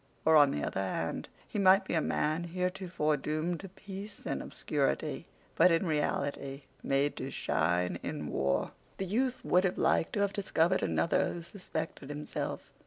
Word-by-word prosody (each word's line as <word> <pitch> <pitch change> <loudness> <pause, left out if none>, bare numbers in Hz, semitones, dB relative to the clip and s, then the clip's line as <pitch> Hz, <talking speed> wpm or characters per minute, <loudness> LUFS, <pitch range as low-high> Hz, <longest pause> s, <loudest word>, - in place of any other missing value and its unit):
Or, 160 - +6
on 145 -2 +8
the 75 - -2
other - - -1
hand, 85 -3 -2 0.2
he 210 - -3
might 195 0 +6
be - - -3
a 160 - +3
man 155 +3 0
heretofore 180 -3 -1
doomed 155 +4 -2
to 195 - -8
peace 195 +2 -9
and - - -2
obscurity, - - -1 0.3
but, - - +6
in 165 +2 +2
reality, 145 -3 -1 0.2
made 140 +1 +1
to - - -4
shine 90 +3 0
in - - -4
war. 70 0 0 0.3
The 190 - -2
youth 250 +7 0
would 180 +1 +4
have 190 -2 0
liked - - +2
to 205 - +1
have 200 0 +1
discovered 185 -3 +2
another 165 - +2
who 170 - -6
suspected 160 -6 -5
himself. 150 0 -4
165 Hz, 170 wpm, -31 LUFS, 145-190 Hz, 0.3 s, on